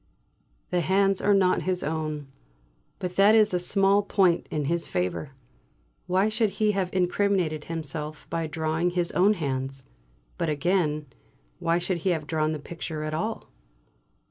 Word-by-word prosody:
The 180 Hz, -, +2 dB
hands 195 Hz, +3 st, +2 dB
are 205 Hz, 0 st, +4 dB
not 185 Hz, -2 st, +3 dB
his 185 Hz, -1 st, -1 dB
own; 155 Hz, -1 st, -3 dB, 0.7 s
but 180 Hz, -1 st, -5 dB
that 205 Hz, +3 st, +6 dB
is 215 Hz, -3 st, +4 dB
a 180 Hz, -, +2 dB
small 195 Hz, +2 st, +3 dB
point 190 Hz, -4 st, +2 dB
in 150 Hz, -2 st, -2 dB
his 170 Hz, +3 st, 0 dB
favour. 90 Hz, +10 st, -2 dB, 0.7 s
Why 185 Hz, +3 st, +2 dB
should 220 Hz, 0 st, +1 dB
he 215 Hz, -1 st, +3 dB
have 195 Hz, -3 st, -1 dB
incriminated 180 Hz, -4 st, 0 dB
himself 155 Hz, -1 st, -5 dB
by 165 Hz, -1 st, -1 dB
drawing 160 Hz, +2 st, -1 dB
his 175 Hz, -1 st, 0 dB
own 200 Hz, +4 st, +4 dB
hands? 135 Hz, -4 st, -3 dB, 0.5 s
But 165 Hz, -, 0 dB
again, 155 Hz, -1 st, 0 dB, 0.5 s
why 165 Hz, 0 st, +1 dB
should 175 Hz, 0 st, -1 dB
he 185 Hz, -, 0 dB
have 160 Hz, -4 st, 0 dB
drawn 155 Hz, 0 st, 0 dB
the 155 Hz, -, -2 dB
picture 160 Hz, 0 st, -6 dB
at 155 Hz, 0 st, -3 dB
all? 220 Hz, +8 st, -3 dB
170 Hz, 155 wpm, -26 LUFS, 155-195 Hz, 0.7 s, that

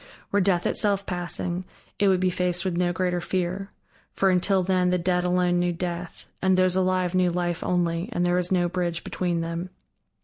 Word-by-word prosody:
Were 205 Hz, -, +3 dB
Death 180 Hz, -2 st, +2 dB
itself 200 Hz, -1 st, 0 dB
passing, 175 Hz, 0 st, -3 dB, 0.4 s
it 200 Hz, -, +4 dB
would 190 Hz, -1 st, +4 dB
be 185 Hz, 0 st, +2 dB
faced 180 Hz, 0 st, 0 dB
with 185 Hz, -2 st, -1 dB
no 175 Hz, 0 st, +1 dB
greater 180 Hz, -1 st, -1 dB
fear: 185 Hz, +2 st, -2 dB, 0.4 s
for 195 Hz, -1 st, +2 dB
until 185 Hz, +1 st, +2 dB
then 180 Hz, 0 st, +2 dB
the 180 Hz, -, +2 dB
dead 180 Hz, 0 st, +1 dB
alone 180 Hz, 0 st, +2 dB
knew 175 Hz, 0 st, +1 dB
Death, 175 Hz, 0 st, -5 dB, 0.2 s
and 190 Hz, -1 st, +3 dB
those 185 Hz, -1 st, +3 dB
alive 185 Hz, -1 st, +1 dB
knew 185 Hz, -1 st, +3 dB
Life 175 Hz, -1 st, -2 dB
only 175 Hz, +1 st, 0 dB
and 175 Hz, -6 st, 0 dB
there 175 Hz, -, +2 dB
was 180 Hz, 0 st, 0 dB
no 175 Hz, -2 st, +3 dB
bridge 175 Hz, -1 st, -2 dB
between 175 Hz, -2 st, -1 dB
them. 170 Hz, +2 st, -4 dB
180 Hz, 195 wpm, -25 LUFS, 175-185 Hz, 0.4 s, it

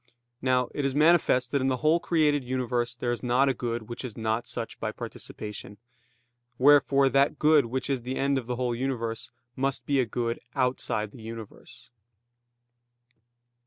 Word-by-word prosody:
Now 125 Hz, -1 st, +2 dB
it 145 Hz, -, -2 dB
is 135 Hz, -1 st, 0 dB
manifest 150 Hz, -5 st, +4 dB
that 140 Hz, -, +1 dB
in 130 Hz, -, +1 dB
the 130 Hz, -1 st, +1 dB
whole 160 Hz, +2 st, +5 dB
created 150 Hz, -5 st, +2 dB
universe 125 Hz, -1 st, -1 dB
there 120 Hz, 0 st, -2 dB
is 120 Hz, -, -3 dB
not 125 Hz, +2 st, +3 dB
a -, -, +2 dB
good 120 Hz, -1 st, -3 dB
which 120 Hz, -, -6 dB
is 125 Hz, -4 st, -7 dB
not 110 Hz, +1 st, -1 dB
such 115 Hz, -2 st, -4 dB
by -, -, -2 dB
participation. 105 Hz, -1 st, -8 dB, 0.8 s
Wherefore 140 Hz, 0 st, +5 dB
that 140 Hz, +3 st, +2 dB
good 150 Hz, -4 st, +4 dB
which 130 Hz, +3 st, -3 dB
is 135 Hz, -3 st, -1 dB
the 125 Hz, +2 st, -4 dB
end 140 Hz, 0 st, +1 dB
of 120 Hz, -, -10 dB
the 125 Hz, -, -2 dB
whole 125 Hz, -1 st, -1 dB
universe 115 Hz, -3 st, -3 dB, 0.3 s
must 135 Hz, 0 st, -1 dB
be 140 Hz, -1 st, +1 dB
a 125 Hz, -, +1 dB
good 115 Hz, +1 st, -2 dB, 0.2 s
outside 125 Hz, -5 st, 0 dB
the 120 Hz, -, -13 dB
universe. 115 Hz, +3 st, -10 dB
125 Hz, 170 wpm, -27 LUFS, 120-135 Hz, 0.8 s, whole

